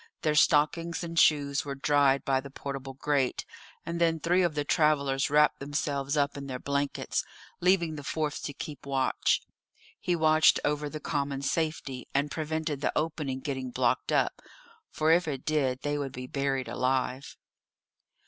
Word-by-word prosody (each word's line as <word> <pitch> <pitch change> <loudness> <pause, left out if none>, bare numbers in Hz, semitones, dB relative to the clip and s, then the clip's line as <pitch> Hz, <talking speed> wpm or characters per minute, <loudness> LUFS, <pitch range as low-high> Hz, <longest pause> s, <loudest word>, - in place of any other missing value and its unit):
Their 155 - +2
stockings 165 +3 +2
and 165 -1 -1
shoes 140 -2 +3
were 140 -1 -5
dried 140 -1 +2
by 135 -1 +2
the 140 - -10
portable 135 -1 -6
grate, 140 -2 0 0.4
and 170 0 -3
then 165 -1 +3
three 175 +3 +2
of 170 -4 +1
the 145 -1 -1
travellers 140 -4 +2
wrapped 150 +1 +4
themselves 140 0 -2
up 140 -1 +1
in 140 -1 -6
their 130 -2 -4
blankets, 140 +2 -1 0.4
leaving 175 -3 +2
the 145 - -7
fourth 150 0 -2
to 145 - -4
keep 145 -1 -8
watch; 135 -1 +1 0.6
he 175 - 0
watched 155 -1 +5
over 150 0 -1
the 155 - -6
common 140 -2 -2
safety, 145 -4 -2
and 145 +1 +1
prevented 155 -2 -3
the - - +1
opening 150 -4 -2
getting 130 -3 -3
blocked 125 -1 0
up, - - +1 0.5
for 155 +1 +1
if 175 +1 +4
it 135 -4 -4
did 135 -4 0
they 145 0 -1
would 135 -2 -4
be 125 0 -6
buried 135 0 -1
alive. 130 +1 -1
145 Hz, 165 wpm, -29 LUFS, 135-155 Hz, 0.6 s, watched